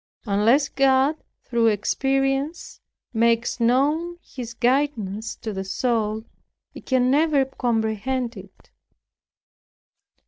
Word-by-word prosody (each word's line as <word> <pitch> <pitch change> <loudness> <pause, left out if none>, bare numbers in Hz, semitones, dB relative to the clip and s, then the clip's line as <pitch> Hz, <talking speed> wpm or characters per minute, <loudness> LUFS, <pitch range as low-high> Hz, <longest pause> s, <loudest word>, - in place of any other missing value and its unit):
Unless 225 +8 +3
God 270 +2 +3 0.3
through 235 -2 +1
experience, 270 - -1 0.3
makes 230 0 +1
known 295 +9 +1
His 240 -2 -8
guidance 235 -5 0
to 220 - -6
the 190 0 -4
soul, 220 +1 -1 0.5
it - - -12
can 255 -1 +2
never 295 -1 +3
comprehend 240 0 -2
it. 195 -1 -14
245 Hz, 95 wpm, -23 LUFS, 220-270 Hz, 0.5 s, Unless